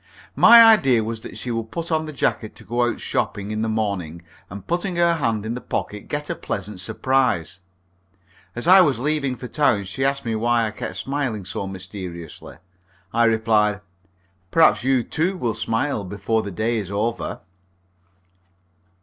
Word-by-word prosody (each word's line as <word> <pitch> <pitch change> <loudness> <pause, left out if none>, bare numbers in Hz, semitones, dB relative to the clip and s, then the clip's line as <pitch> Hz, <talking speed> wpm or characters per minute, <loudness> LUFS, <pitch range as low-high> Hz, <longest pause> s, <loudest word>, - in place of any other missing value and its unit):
My 230 0 +9
idea 140 - +5
was 110 0 -5
that - - -9
she 125 - -4
would 115 -1 -3
put 170 +4 -5
on 160 0 0
the - - -5
jacket 110 -6 -2
to - - -11
go 120 +1 0
out - - -5
shopping 100 +1 -2
in 110 0 -2
the 110 - -1
morning, 100 -7 -3 0.3
and 100 +1 -9
putting 175 +2 -2
her 170 -1 +3
hand 115 -7 -1
in 110 - -3
the 125 - -6
pocket, 105 -1 -4
get 150 0 -3
a - - -2
pleasant 100 -3 -5
surprise. 95 - 0 1.0
As 120 - -4
I 190 +1 +8
was 145 -8 +2
leaving 140 0 -1
for 125 - -8
town, 120 -8 +1
she 100 +8 -4
asked 140 0 0
me 115 - -1
why 115 +1 +1
I 110 - -3
kept 105 - -5
on - - -10
smiling 130 -8 -3
so 95 - -4
mysteriously. 95 -5 -8 0.6
I 115 +1 +3
replied, 110 -2 +2 0.7
"Perhaps 160 - +4
you, 130 -2 +2
too, 180 +9 -1
will 120 -8 -1
smile 115 +1 -1
before 105 +4 -1
the 100 - -6
day 110 +5 -1
is 100 -3 -6
over." 110 +4 -3
115 Hz, 175 wpm, -22 LUFS, 105-140 Hz, 1.0 s, My